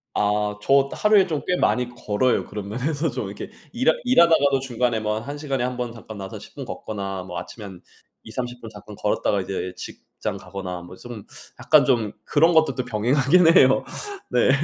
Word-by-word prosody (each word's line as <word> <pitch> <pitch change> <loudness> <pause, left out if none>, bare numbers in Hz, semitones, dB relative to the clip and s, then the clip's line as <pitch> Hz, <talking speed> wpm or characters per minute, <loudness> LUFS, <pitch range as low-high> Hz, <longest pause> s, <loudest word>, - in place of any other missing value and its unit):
아. 105 0 +1
저 135 +3 +3
하루에 210 -2 +4
좀 155 -4 -2
꽤 180 - +2
많이 125 -1 +1
걸어요. 120 +1 0
그런 100 -1 -7
면에서 145 +7 -1
좀 105 - -4
이렇게 100 - -7 0.2
일하 245 +1 +3
일하다가도 165 - +4
중간에 125 -3 0
뭐 105 0 -1
1 140 +6 -6
시간에 135 -4 -2
1 125 0 -2
번 120 -1 -3
잠깐 110 -2 -10
나와서 95 -1 -7
10 - - -14
분 - - -6
걷거나 95 -3 -5
뭐 90 -2 -6
아침에 105 +4 -9
한 95 -3 -10 0.4
2-30 120 +2 -5
분 115 - -8
잠깐 105 -1 -12
걸었다가 100 -1 0
이제 95 -1 -4
직장 - - -7
가거나 90 -3 -6
뭐 90 +1 -11
좀 120 -3 -9 0.4
약간 - - +5
좀 115 -6 +1
그런 165 +4 +4
것도 155 -5 +3
또 125 -1 -3
병행하긴 135 +9 +4
해요. 130 0 +6 0.5
네. - - +3
120 Hz, 330 characters per minute, -23 LUFS, 105-140 Hz, 0.5 s, 해요